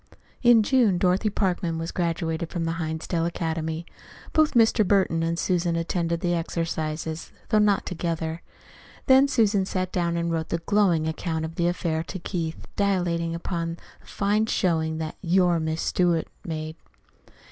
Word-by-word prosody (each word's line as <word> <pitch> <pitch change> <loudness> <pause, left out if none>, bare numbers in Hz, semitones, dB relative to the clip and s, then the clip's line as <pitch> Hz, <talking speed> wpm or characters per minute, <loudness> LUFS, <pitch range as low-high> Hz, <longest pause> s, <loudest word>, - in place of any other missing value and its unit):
In 240 -3 +6
June 230 -6 +3
Dorothy 185 +4 +2
Parkman 180 -4 -1
was 165 +1 -4
graduated 165 -1 -2
from 170 -2 -3
the 165 - -1
Hinsdale 165 +1 -2
Academy. 160 -1 -3 0.5
Both 310 -3 +3
Mr. 225 -1 +5
Burton 190 -4 +2
and 165 0 -1
Susan 175 -1 0
attended 170 0 -1
the 175 -2 +1
exercises, 160 -1 -3 0.2
though 215 - +4
not 210 -1 +3
together. 165 -2 -3 0.6
Then 265 +1 +6
Susan 215 -7 +2
sat 185 -1 -2
down 170 -1 0
and 170 0 -1
wrote 160 -1 -2
a - - +2
glowing 170 -3 +2
account 160 0 -2
of 160 - -6
the 170 +1 0
affair 170 -2 -1
to 190 - -6
Keith, 170 -2 -4
dilating 175 -4 0
upon 170 -1 -3 0.2
the - - -23
fine 210 +2 +1
showing 160 -6 0
that 160 -1 -5
"your 180 -1 +3
Miss 160 0 -2
Stewart" 175 -3 +1 0.2
made. 155 -1 -5
170 Hz, 155 wpm, -25 LUFS, 165-190 Hz, 0.6 s, In